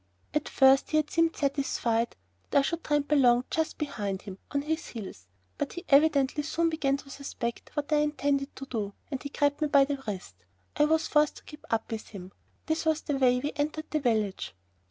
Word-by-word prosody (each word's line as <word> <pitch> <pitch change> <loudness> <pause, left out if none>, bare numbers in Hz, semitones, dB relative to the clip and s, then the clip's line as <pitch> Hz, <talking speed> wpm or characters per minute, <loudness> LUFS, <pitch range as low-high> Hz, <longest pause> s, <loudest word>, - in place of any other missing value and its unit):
At 300 0 -1
first 270 0 +5
he 310 - +2
had 305 -1 0
seemed 330 0 +2
satisfied 265 -5 0 0.3
that - - +2
I - - +7
should 330 +4 -2
tramp 295 -1 0
along 250 -4 +5
just 320 0 -1
behind 205 -10 -3
him, 190 -1 -9
on 280 0 -1
his 320 +2 -2
heels, 190 - -8 0.3
but - - -2
he 350 - -7
evidently 285 -1 +4
soon 330 +2 0
began 280 -3 +1
to 275 - -13
suspect 245 -4 -5
what 295 +1 -1
I - - +5
intended 285 -2 0
to 270 - -7
do, 215 -6 -3 0.2
and 265 -2 -3
he 285 - -5
grabbed 285 +1 +1
me 305 - +3
by 280 -1 +5
the 280 -1 -3
wrist. 185 - -5 0.4
I 295 - +4
was 320 +1 +2
forced 300 0 +3
to - - -13
keep 300 - -12
up 225 0 -1
with 220 -1 -4
him. 190 -3 -9 0.3
This 315 0 0
was 315 -1 +1
the 285 -3 -2
way 250 -1 +4
we 290 +2 -2
entered 305 +2 -2
the 310 - +1
village. 215 - -1
280 Hz, 210 wpm, -28 LUFS, 240-300 Hz, 0.4 s, I